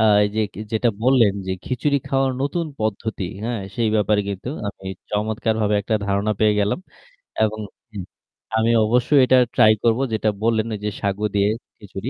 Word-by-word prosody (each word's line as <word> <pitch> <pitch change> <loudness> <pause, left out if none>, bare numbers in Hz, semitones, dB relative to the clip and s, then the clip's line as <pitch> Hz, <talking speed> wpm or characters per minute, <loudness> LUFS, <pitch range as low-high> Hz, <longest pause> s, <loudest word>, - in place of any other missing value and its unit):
আ - - +4 0.2
এই 105 - +1
যে - - +2
কে - - -9
যেটা 110 +2 +2
বললেন 125 -5 +4
যে 95 - -1
খিচুড়ি 140 +3 0
খাওয়ার 135 -1 +1
নতুন 165 +4 -1
পদ্ধতি, 110 -1 -2 0.2
হ্যাঁ 120 -2 -2
সেই 115 0 +1
ব্যাপারে 105 0 +2
কিন্তু 100 +4 -5 0.2
আমি 95 -1 -10 0.2
চমৎকারভাবে 110 0 0
একটা 105 +2 -2
ধারণা 100 +2 +1
পেয়ে 110 -1 +4
গেলাম। 105 - 0 0.7
এবং 110 0 -1 0.4
উ - - -5 0.6
আমি 110 +1 +3
অবশ্যই 125 +6 +3
এটা 130 0 +5 0.2
try 110 - +6
করব 115 +1 +3
যেটা 110 0 +1
বললেন 115 -1 +2
ওই 105 - -4
যে - - +1
সাগু 100 +1 -1
দিয়ে 100 0 +3 0.3
খিচুড়ি। 100 +3 -7
110 Hz, 175 wpm, -22 LUFS, 105-120 Hz, 0.7 s, try